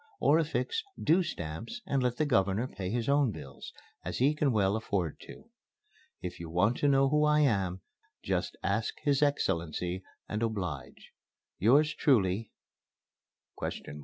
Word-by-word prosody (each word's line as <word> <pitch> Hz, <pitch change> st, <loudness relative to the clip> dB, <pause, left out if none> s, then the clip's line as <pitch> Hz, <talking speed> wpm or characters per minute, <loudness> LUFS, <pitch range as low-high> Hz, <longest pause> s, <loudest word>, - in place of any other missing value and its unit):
Or 155 Hz, +3 st, +4 dB
affix 310 Hz, -, -1 dB, 0.2 s
'due' 165 Hz, +5 st, +4 dB
stamps, 85 Hz, -, -5 dB
and 135 Hz, -1 st, 0 dB
let 125 Hz, -1 st, 0 dB
the 155 Hz, -, +2 dB
Governor 110 Hz, -3 st, +2 dB
pay 95 Hz, -7 st, -5 dB
his 115 Hz, +2 st, -1 dB
own 140 Hz, -2 st, +3 dB
bills, -, -, -9 dB, 0.3 s
as -, -, -4 dB
he 140 Hz, +4 st, +3 dB
can 150 Hz, -2 st, +1 dB
well 100 Hz, -3 st, +2 dB
afford 100 Hz, -7 st, -2 dB
to. -, -, -13 dB, 0.7 s
If 90 Hz, -1 st, -5 dB
you 85 Hz, -1 st, -7 dB
want 100 Hz, +8 st, +2 dB
to 145 Hz, -, +1 dB
know 135 Hz, -1 st, +4 dB
who 150 Hz, +1 st, +3 dB
I 150 Hz, 0 st, +4 dB
am, 95 Hz, -9 st, +1 dB, 0.4 s
just -, -, -2 dB
ask 110 Hz, -, 0 dB
his 145 Hz, -2 st, +2 dB
Excellency, 90 Hz, -, 0 dB, 0.3 s
and 105 Hz, -, -3 dB
oblige, 90 Hz, -, -4 dB, 0.5 s
Yours 145 Hz, +9 st, +4 dB
truly, 110 Hz, -, +2 dB
?" -, -, -63 dB
115 Hz, 150 wpm, -30 LUFS, 95-145 Hz, 0.7 s, Or